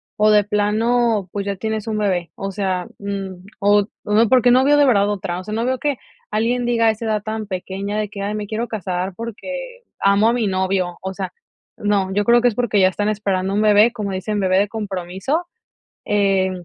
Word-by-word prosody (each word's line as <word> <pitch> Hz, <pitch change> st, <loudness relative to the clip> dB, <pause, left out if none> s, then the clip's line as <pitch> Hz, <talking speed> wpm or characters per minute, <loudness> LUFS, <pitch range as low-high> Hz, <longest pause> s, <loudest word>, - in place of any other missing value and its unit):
o 215 Hz, 0 st, +4 dB
de 210 Hz, -1 st, +4 dB
plano, 215 Hz, +1 st, +1 dB
pues, 200 Hz, -1 st, -3 dB
ya 200 Hz, -1 st, -3 dB
tienes 220 Hz, +2 st, -3 dB
un 220 Hz, -1 st, -1 dB
bebé, 185 Hz, -5 st, -1 dB
o 195 Hz, 0 st, -4 dB
sea, 190 Hz, -2 st, -2 dB
mm, 195 Hz, -2 st, -5 dB
o 205 Hz, 0 st, +3 dB, 0.2 s
no, 215 Hz, +2 st, +3 dB
porque, 250 Hz, 0 st, +5 dB
no 255 Hz, +2 st, +5 dB
veo 290 Hz, +2 st, +4 dB
de 290 Hz, -, +5 dB
verdad 205 Hz, -6 st, +3 dB
otra. 180 Hz, -3 st, -3 dB
O -, -, -8 dB
sea, 210 Hz, +2 st, -6 dB
no 225 Hz, +2 st, -1 dB
veo 260 Hz, 0 st, 0 dB
que 290 Hz, -1 st, -1 dB, 0.3 s
alguien 235 Hz, +3 st, 0 dB
diga 235 Hz, -1 st, +2 dB
a -, -, +6 dB
esa 220 Hz, +1 st, -7 dB
edad 215 Hz, -2 st, -1 dB
tan 220 Hz, 0 st, -4 dB
pequeña, 195 Hz, +2 st, -4 dB
de 210 Hz, -, -1 dB
que: 200 Hz, 0 st, -8 dB
"Ay, 200 Hz, +1 st, -2 dB
me 210 Hz, -1 st, -4 dB
quiero 225 Hz, +3 st, -3 dB
casar, 185 Hz, -3 st, -3 dB
porque, -, -, -7 dB, 0.2 s
amo 200 Hz, +3 st, +4 dB
a -, -, +2 dB
mi 240 Hz, -3 st, 0 dB
novio", 185 Hz, -2 st, -1 dB
o 190 Hz, 0 st, -4 dB
sea, 190 Hz, 0 st, -5 dB, 0.4 s
no, 200 Hz, -2 st, 0 dB
yo 205 Hz, +1 st, +1 dB
creo 235 Hz, +3 st, +5 dB
que 245 Hz, -, +4 dB
es 235 Hz, -, 0 dB
porque 225 Hz, -4 st, +1 dB
ya 185 Hz, -, +6 dB
están 205 Hz, +3 st, -1 dB
esperando 195 Hz, -2 st, -1 dB
un 205 Hz, -, +1 dB
bebé, 215 Hz, +2 st, +5 dB
como 210 Hz, -4 st, -4 dB
dicen 205 Hz, +3 st, -2 dB
bebé 190 Hz, -1 st, +2 dB
de 205 Hz, 0 st, +1 dB
compromiso, 200 Hz, -, -3 dB, 0.6 s
eh, 195 Hz, -2 st, +2 dB
205 Hz, 220 wpm, -20 LUFS, 195-225 Hz, 0.6 s, a